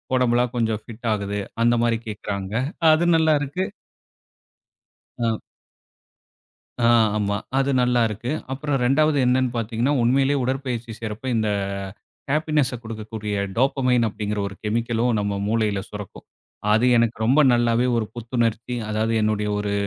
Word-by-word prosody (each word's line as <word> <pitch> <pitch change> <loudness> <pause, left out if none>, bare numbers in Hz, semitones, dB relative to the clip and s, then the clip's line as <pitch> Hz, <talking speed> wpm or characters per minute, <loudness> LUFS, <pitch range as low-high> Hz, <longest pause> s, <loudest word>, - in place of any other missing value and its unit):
உடம்பெல்லாம் 125 -1 +2
கொஞ்சம் 110 -2 0
ஃபிட் 115 +1 -8
ஆகுது" 100 -1 -3 0.2
அந்த 120 +1 +4
மாதிரி 115 -1 +2
கேக்கறாங்க. 100 -2 -5 0.4
அது 155 +2 +3
நல்லாருக்கு. 155 +1 +1 1.6
ஆ. 115 -1 +1 1.5
அ, - - +6 0.3
ஆமா. 100 -1 0 0.2
அது 135 +1 +1
நல்லா 125 0 +2
இருக்கு. 110 +3 -5 0.2
அப்புறம் 145 +1 -1
2வது 145 +4 +3
என்னன்னு 130 0 +2
பார்த்தீங்கன்னா 115 +4 0
உண்மையிலேயே 135 +4 +3
உடற்பயிற்சி 125 -3 -3
செய்யறப்போ 110 +2 -6
இந்த 110 -1 +1 0.8
ஹேப்பினஸ்ஸ 150 -3 +1
கொடுக்கக்கூடிய 110 -2 -5 0.2
டோப்பமைன் 125 -2 +2
அப்படிங்கற 105 0 -4
ஒரு 100 - -11
கெமிக்கலும், 115 +2 0
நம்ம 100 0 -1
மூளையில 105 -2 0
சுரக்கும். 105 -2 -9 0.5
அது 110 +3 +3
எனக்கு 115 -1 +2
ரொம்ப 130 +7 +4
நல்லாவே 120 0 +2
ஒரு 115 -2 0
புத்துணர்ச்சி, 120 0 -2 0.2
அதாவது 110 +1 0
என்னுடைய 105 -1 0
ஒரு 105 0 -2
115 Hz, 125 wpm, -23 LUFS, 110-130 Hz, 1.6 s, அ